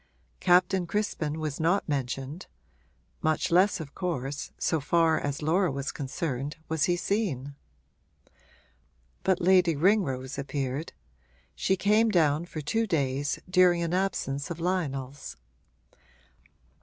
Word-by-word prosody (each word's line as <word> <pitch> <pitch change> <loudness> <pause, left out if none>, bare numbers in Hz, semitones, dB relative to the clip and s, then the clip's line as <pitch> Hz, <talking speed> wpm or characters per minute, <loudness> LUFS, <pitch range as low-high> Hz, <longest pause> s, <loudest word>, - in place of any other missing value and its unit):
Captain 180 0 +3
Crispin 165 -7 -2
was 155 -3 -3
not 170 +5 +1
mentioned; 135 +3 -3 0.7
much 155 +1 0
less 185 +4 +4
of 150 -3 -8
course, 145 -6 -3
so 160 - 0
far 160 +2 +2
as 145 +1 -3
Laura 175 +3 +2
was 140 0 -3
concerned, 140 0 -4
was 160 -2 +1
he 175 - +2
seen. 170 - -2 1.7
But 190 -2 +2
Lady 180 -2 +4
Ringrose 145 -7 +1
appeared; 140 +1 -3 0.6
she 190 - 0
came 215 +4 +3
down 160 -4 +2
for 155 - -6
two 225 +10 0
days, 145 -4 0
during 180 -1 +4
an 170 0 -2
absence 175 -7 -1
of 170 -1 -5
Lionel's. 140 - -3
160 Hz, 120 wpm, -28 LUFS, 140-180 Hz, 1.7 s, less